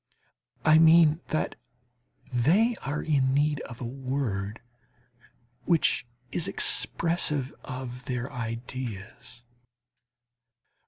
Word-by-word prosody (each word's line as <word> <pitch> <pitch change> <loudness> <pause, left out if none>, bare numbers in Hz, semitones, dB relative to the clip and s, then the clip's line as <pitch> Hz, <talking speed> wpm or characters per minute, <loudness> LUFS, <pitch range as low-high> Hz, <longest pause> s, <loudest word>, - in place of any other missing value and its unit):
I 155 0 +7
mean 165 0 +6
that 155 - -1 0.8
they 185 - +3
are 140 +3 -3
in 135 -4 +2
need 145 0 +2
of 125 - -10
a - - -3
word 120 -5 -3 1.1
which 165 -7 +2 0.2
is - - 0
expressive 150 -5 +1
of 125 -1 -7
their 125 +1 -3
ideas. 120 -1 -6
130 Hz, 90 wpm, -27 LUFS, 125-155 Hz, 1.1 s, I